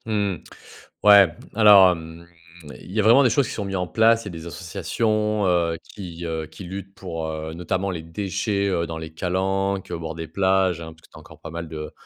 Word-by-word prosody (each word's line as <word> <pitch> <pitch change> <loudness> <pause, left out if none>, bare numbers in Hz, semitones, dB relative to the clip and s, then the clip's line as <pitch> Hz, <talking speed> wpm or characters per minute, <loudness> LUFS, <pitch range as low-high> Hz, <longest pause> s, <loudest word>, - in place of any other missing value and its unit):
Mmh. 105 -4 -1 0.7
Ouais, 100 -2 +8 0.3
alors, 100 -4 +8
hem, 80 0 -8 0.5
il - - -12
y 110 - -1
a - - +3
vraiment 120 +6 +6
des 125 - +4
choses 120 +2 +2
qui - - -6
sont 105 - -4
mis 95 0 -4
en 90 -1 -1
place. 115 +3 +3
Il - - -16
y - - -4
a - - -8
des 85 0 -8
associations, 105 +5 -1
heu, 85 -2 +1
qui, 85 -4 -9
heu, 80 -1 -3
qui 80 - -12
luttent 95 +2 -8
pour, 85 -4 -5
heu, 80 0 -5
notamment 95 +3 -2
les 85 -3 -5
déchets, 100 +3 -2
heu, 85 -3 -1
dans 80 0 -5
les 80 0 -8
calanques, 95 +2 -1
heu, - - -2
au - - -6
bord 80 -1 -6
des 80 -1 -6
plages, 95 0 +1
hein, 80 -1 -8
parce 80 - -24
que - - -20
tu - - -14
as - - -10
encore 80 0 -16
pas 80 - -8
mal 85 +1 -6
de 75 -1 -7
90 Hz, 240 wpm, -23 LUFS, 80-100 Hz, 0.7 s, Ouais